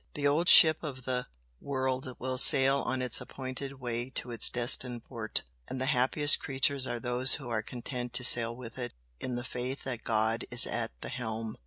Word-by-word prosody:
The 145 - -5
old 155 +5 +1
ship 155 -2 +7
of 130 -5 -9
the 125 -1 -4 0.3
world 130 -2 -5
will 130 0 -2
sail 135 +1 +7
on 130 -1 -4
its 125 - +1
appointed 135 +1 -8
way 120 0 -6
to 125 -1 -2
its 115 - +6
destined 120 -1 +2
port, 115 -4 -4 0.2
and 130 - -8
the 130 - -3
happiest 145 +2 +2
creatures 135 0 -2
are 120 -1 -5
those 125 +2 +1
who 135 -5 -10
are 110 -2 -3
content 125 +1 -8
to 125 - +2
sail 115 -1 +5
with 120 0 -11
it 120 - -6 0.2
in 125 - -6
the 120 - -6
faith 125 +2 -7
that 125 -3 -7
God 110 0 -2
is - - +6
at - - -5
the - - -7
helm!" 110 -3 -7
125 Hz, 195 wpm, -27 LUFS, 120-130 Hz, 0.3 s, ship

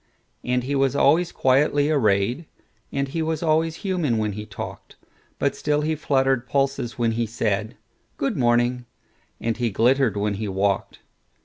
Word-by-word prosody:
And 125 0 0
he 135 +3 -3
was 135 0 +1
always 165 +5 +3
quietly 145 +3 +2
arrayed, 120 +3 +1 0.4
And 140 0 -1
he 165 +4 -2
was 160 0 -2
always 160 0 +1
human 170 - 0
when 105 -1 0
he 105 +1 -7
talked; 100 - -8 0.4
But - - 0
still 150 0 0
he 155 +1 0
fluttered 135 -4 +1
pulses 135 -3 -1
when 115 -2 +1
he 115 0 -1
said,"Good 110 +4 -4
morning," 120 0 +1 0.5
and 115 -1 -2
he 120 -1 0
glittered 120 +2 +2
when 105 0 0
he 110 - -2
walked. 100 0 -1
130 Hz, 150 wpm, -23 LUFS, 115-145 Hz, 0.5 s, always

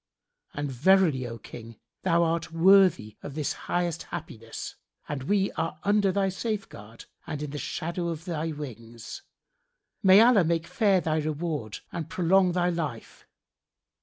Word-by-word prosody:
And 145 -1 -3
verily, 150 -1 +3
O 115 0 -6
King, 115 +1 -11 0.3
thou 170 -2 +3
art 165 0 -1
worthy 170 - +4
of 140 - -8
this 150 -2 -1
highest 175 -2 -2
happiness, 145 -10 -7 0.3
and 145 -2 -4
we 195 +7 +1
are 165 -1 -3
under 205 -1 +3
thy 195 0 +1
safeguard 190 - -5 0.2
and 150 -1 -4
in 150 - -5
the 145 - -5
shadow 170 +4 -3
of 165 -1 -5
thy 165 -2 -2
wings, 115 -6 -8 0.8
may 190 0 +7
Allah 230 -4 +6
make 165 0 0
fair 195 -2 +2
thy 155 -1 0
reward 150 -7 -3
and 165 -3 -5
prolong 185 +1 +3
thy 180 0 +1
life! 155 -9 -5
165 Hz, 145 wpm, -27 LUFS, 145-185 Hz, 0.8 s, may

